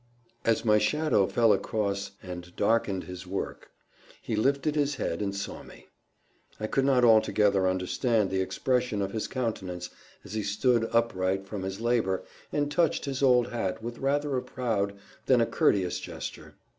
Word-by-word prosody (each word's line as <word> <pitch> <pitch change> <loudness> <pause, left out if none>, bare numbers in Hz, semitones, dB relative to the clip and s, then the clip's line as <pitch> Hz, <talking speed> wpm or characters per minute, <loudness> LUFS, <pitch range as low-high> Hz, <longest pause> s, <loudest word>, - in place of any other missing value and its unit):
As 115 0 +1
my 105 -1 +5
shadow 105 -2 +2
fell 115 -2 +4
across 100 -2 -2
and 90 -1 -8
darkened 100 -3 +1
his 90 0 -9
work, 95 +2 -5 0.5
he 110 - -3
lifted 140 +7 +1
his 145 -1 +1
head 85 -8 -2
and 100 -1 -2
saw 100 - -5
me. - - -15 0.7
I 110 - -2
could 135 +5 +1
not 130 -3 +4
altogether 105 -4 +4
understand 95 +4 +1
the 95 0 +1
expression 105 +3 0
of 95 - -3
his 110 0 -3
countenance 95 -8 -4 0.3
as - - -9
he 110 - -1
stood 115 +3 +1
upright 95 -5 +1
from 100 0 -5
his 95 +1 -4
labour 115 -5 +1 0.3
and 145 0 0
touched 165 0 +1
his 135 -1 -3
old 125 -3 +4
hat 110 -3 -3
with 120 0 -6
rather 145 +1 0
a - - 0
proud 110 -6 -2 0.3
than 130 -2 +5
a 115 - +4
courteous 95 -5 +1
gesture. - - -8
110 Hz, 165 wpm, -28 LUFS, 95-125 Hz, 0.7 s, my